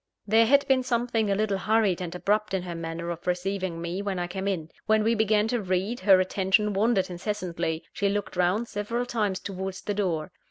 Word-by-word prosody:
There 220 +2 +4
had 280 +3 +4
been 265 -1 +4
something 235 -3 0
a 200 - +2
little 205 -1 0
hurried 210 -3 +2
and 175 -1 -5
abrupt 210 +2 0
in 185 - -2
her 175 -1 -5
manner 165 +1 -4
of 170 +1 -8
receiving 180 -1 -1
me, 170 +3 -3
when 200 -2 -2
I 175 - -1
came 190 +2 -4
in. 165 -5 -2 0.2
When 220 0 +4
we 225 +2 +3
began 215 -1 +2
to 240 -1 0
read, 190 +5 -1
her 190 -1 +6
attention 190 +3 +2
wandered 195 -2 +2
incessantly; 175 -4 -3
she 200 - 0
looked 205 -1 -2
round 180 +6 +1
several 230 +4 -2
times 210 -6 -1
towards 190 -1 -5
the 205 - -2
door. 185 -5 -1
195 Hz, 205 wpm, -27 LUFS, 180-215 Hz, 0.2 s, her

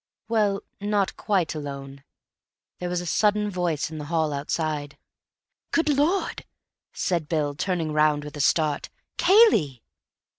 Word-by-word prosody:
Well, 210 -3 +1 0.2
not 205 -1 0
quite 190 -6 0
alone. 140 -2 -7 0.8
There 180 - -3
was 175 0 -1
a - - -7
sudden 210 +3 +2
voice 175 -5 -1
in 155 - -6
the 150 - -6
hall 160 -1 0
outside. 145 0 -3 0.7
"Good 325 -2 +1
Lord!" 300 +7 +1 0.5
said 170 -5 -1
Bill, 150 -3 0
turning 165 0 -2
round 150 -1 +3
with 150 +1 -8
a 145 - -2
start, 150 +1 +1 0.3
"Cayley!" 210 - +4
165 Hz, 135 wpm, -25 LUFS, 150-205 Hz, 0.8 s, Cayley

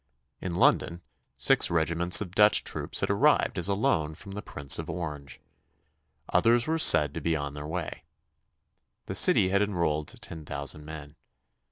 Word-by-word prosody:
In 90 -2 -6
London 85 0 +1 0.3
six - - +2
regiments 85 +2 +3
of 95 -5 -6
Dutch 105 +1 +4
troops - - -2
had - - -1
arrived - - +1
as 85 - -2
a 100 - -1
loan 80 - -1
from 100 +4 -12
the 105 +1 -7
Prince 70 -7 -1
of 80 +1 -7
Orange. 75 -5 -7 0.9
Others 120 +1 +2
were 160 +1 -2
said 75 - +5
to - - -7
be 85 -1 -1
on 70 -1 -5
their 75 0 -8
way. 85 0 -6 1.0
The - - -6
City 95 - +5
had 100 +1 0
enrolled 85 -7 -2
ten 80 -2 -10
thousand 70 0 -7
men. 75 -1 -11
85 Hz, 165 wpm, -26 LUFS, 75-95 Hz, 1.0 s, said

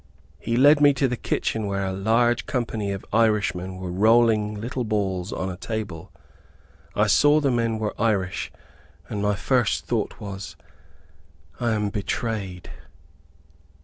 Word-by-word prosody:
He 115 +1 -1
led 145 +3 +6
me 145 -1 +6
to 135 0 +2
the 125 - -2
kitchen, 110 -2 -2
where 100 0 -1
a 95 - -2
large 115 +5 +1
company 110 -5 -2
of 100 -1 -5
Irish 110 -2 +3
men 95 +1 -6
were 95 -1 -5
rolling 110 +1 +3
little 120 +4 -3
balls 100 -4 -2
on 95 - -3
a - - -6
table. 95 -3 -5 0.8
I 105 - +3
saw 145 +8 +5
the 140 -3 +1
men 115 -2 0
were 110 -1 -2
Irish 100 -5 0 0.6
and 105 - -3
my 105 0 +1
first 120 +3 +1
thought - - -2
was, 95 -4 -7 1.0
"I 120 -2 +1
am 105 -1 0
betrayed." 100 -2 -3
105 Hz, 145 wpm, -24 LUFS, 95-115 Hz, 1.0 s, led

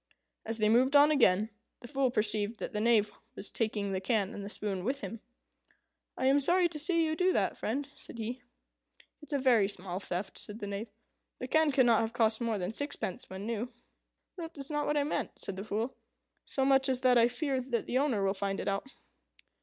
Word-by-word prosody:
As 225 0 -1
they 215 -1 +2
moved 255 +6 +4
on 290 +1 +7
again, 220 -6 +3 0.3
the 240 - -9
Fool 270 0 +1
perceived 215 -1 0
that - - -5
the 210 - -1
Knave 215 -2 +3 0.2
was 200 - -5
taking 210 -3 -1
the 190 -1 -1
can 205 +1 0
and 200 - -6
the 200 - -6
spoon 200 -3 -3
with 270 +6 -1
him. 230 - -6 1.0
"I 260 - -1
am 275 +2 +5
sorry 350 +5 +4
to 310 -2 -6
see 335 +1 +2
you 315 0 0
do 365 +3 +3
that, - - +1
friend," 275 +6 -2
said - - -12
he. 235 +3 -4 0.8
"It's 300 - -13
a 285 - +2
very 245 -7 +4
small 185 -2 -4
theft," 190 0 -4
said 210 - -8
the 210 - -5
Knave. 200 +3 -4 0.5
"The 255 - -5
can 315 +2 +3
cannot 245 -4 +4
have 225 0 -2
cost 225 -1 +2
more 230 -2 0
than 185 +2 -3
sixpence 285 -8 -4
when 190 +2 -6
new." 230 +1 -2 0.7
"That 330 -2 -7
was 275 +1 -6
not 295 0 -1
what 295 - +1
I 290 - +3
meant," 295 - -3
said 195 - -4
the 190 - -5
Fool, 220 +4 -2 0.5
"so 270 - -1
much 270 0 +4
as 255 -1 0
that 250 -2 +5
I 230 - +6
fear 265 +2 -1
the 245 0 -1
owner 255 -8 +1
will 195 0 +2
find 195 0 -2
it - - -4
out." 200 +5 -1
235 Hz, 215 wpm, -31 LUFS, 205-275 Hz, 1.0 s, on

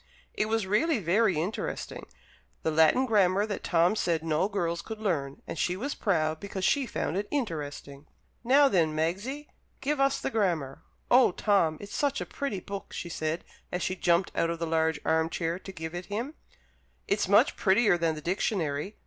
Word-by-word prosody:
It 210 - 0
was 225 -2 0
really 270 - +2
very 195 +1 +2
interesting 180 +7 -4 0.6
the 160 - +1
Latin 160 +12 +4
Grammar 200 -3 +3
that 210 -2 -5
Tom 170 0 +3
had 220 - -3
said 165 -2 0
no 165 +4 +1
girls 170 -4 -1
could 220 +5 -7
learn, 150 -10 -2
and - - -6
she 180 +1 0
was 275 +8 -3
proud 160 -5 0
because 195 0 -4
she 275 -3 +2
found 175 -5 -2
it 205 +1 -2
interesting. 150 - -4 0.4
"Now, 275 +4 +6
then, 165 - +2
Magsie, 205 - -2 0.3
give 290 +1 -1
us 275 0 +2
the - - -3
Grammar!" 170 - -1 0.3
"Oh, 245 -6 +6
Tom, 175 -7 +2
it's 205 - -9
such 285 -1 0
a - - -3
pretty 275 -9 -4
book!" 200 +1 -7
she 170 - -5
said, 160 0 -2 0.3
as 180 - -2
she 185 - -1
jumped 175 0 +2
out 165 - +1
of 170 - -2
the 165 - -2
large 160 -1 +1
arm 160 0 +2
chair 165 +1 -2
to 195 - -9
give 160 -2 -6
it 175 0 -6
him; 230 +8 -3 0.7
"it's - - +1
much - - +4
prettier 205 0 +4
than 165 -2 0
the 155 - -7
Dictionary. 180 -1 -1
185 Hz, 190 wpm, -28 LUFS, 160-215 Hz, 0.7 s, Now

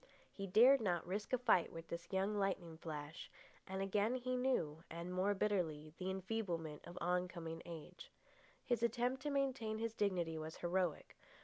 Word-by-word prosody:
He 195 -1 -4
dared 240 +8 +7
not 175 -5 +1
risk 200 +3 -3
a 255 - +4
fight 230 -8 +4
with 165 0 -8
this 170 0 -6
young 195 +2 +1
lightning 190 -5 -1
flash, 150 -1 -6 0.4
and 190 +1 -2
again 205 +5 +2
he 255 0 -1
knew, 170 - +1
and 170 +2 -5
more 195 +3 +2
bitterly, 165 -7 0
the 185 0 -2
enfeeblement 185 -6 -2
of 175 - -9
oncoming 175 -2 -1
age. 170 - -9 0.5
His 240 -3 +1
attempt 240 +3 +1
to 295 - -1
maintain 265 -6 0
his 225 0 -2
dignity 175 -7 0
was 155 +1 -5
heroic. 175 -2 0
190 Hz, 165 wpm, -39 LUFS, 170-225 Hz, 0.5 s, dared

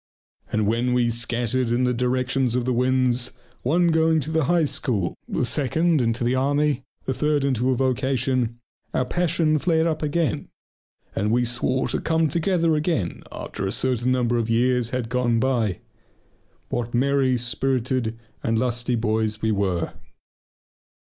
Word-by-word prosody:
And 110 -1 +1
when 120 +4 +1
we 120 -1 +2
scattered 120 +1 -1
in 120 +2 +1
the 125 0 +2
directions 125 0 0
of 125 -1 0
the 130 - +1
winds, 125 0 +1 0.3
one 170 +7 +2
going 160 0 +3
to 155 - -3
the 160 -3 +1
High 170 0 +3
School, 110 -10 -1 0.2
the - - 0
second 155 +5 +2
into 115 +1 0
the 120 +1 +1
army, 145 +1 +1 0.2
the 130 - -1
third 150 +1 +1
into 130 -2 +1
a 130 - +2
vocation, 130 -2 0 0.4
our 130 - +1
passion 160 0 +1
flared 160 0 +2
up 155 -2 -1
again, 150 0 -1 0.7
and 105 +2 0
we 120 +2 +2
swore 125 +2 0
to - - -1
come 160 -1 +1
together 170 -1 +1
again 150 - -1
after 95 - -5
a - - -1
certain 125 +1 +1
number 120 -1 +1
of 115 -1 -2
years 120 +1 +2
had 125 -2 -2
gone 120 -1 +1
by. 115 -7 0 0.9
What 120 0 -2
merry, 135 0 +2
spirited, 125 -1 -1 0.2
and 115 0 0
lusty 120 0 0
boys 110 -1 -1
we 110 - +2
were!... 95 -5 -1
125 Hz, 155 wpm, -23 LUFS, 120-140 Hz, 0.9 s, going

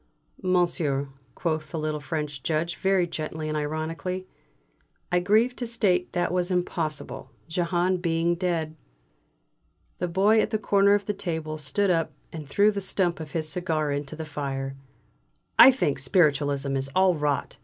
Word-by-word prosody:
"Monsieur," 170 -7 +1 0.3
quoth 155 -3 -2
the 160 - -5
little 155 -1 -2
French 145 -1 -4
Judge 165 +4 -1
very 190 -2 +2
gently 155 -1 -5
and 155 - -2
ironically, 160 +5 -3 0.9
"I 180 - +4
grieve 220 +7 +3
to 240 - -3
state 185 -6 +1
that 175 -2 0
was 180 0 0
impossible, 170 -4 -2 0.2
Jehane 175 +2 +1
being 170 0 +1
dead." 170 -3 -2 1.2
The 180 - -1
Boy 200 +5 +4
at - - -1
the 215 - 0
corner 200 -1 +4
of 205 - -2
the 210 - -1
table 160 -5 -3
stood 180 +8 +1
up 165 -2 0 0.2
and 155 -4 -7
threw 205 +7 +4
the 200 -1 -4
stump 185 -3 +1
of 155 -2 -8
his 160 -2 -1
cigar 155 -3 -1
into 145 +1 -3
the 160 0 -6
fire. 135 -2 -4 0.8
"I - - +12
think 195 - 0
Spiritualism 140 -2 +2
is 135 0 -1
all 185 -1 +5
rot!" 150 -3 -1
165 Hz, 155 wpm, -26 LUFS, 150-185 Hz, 1.2 s, I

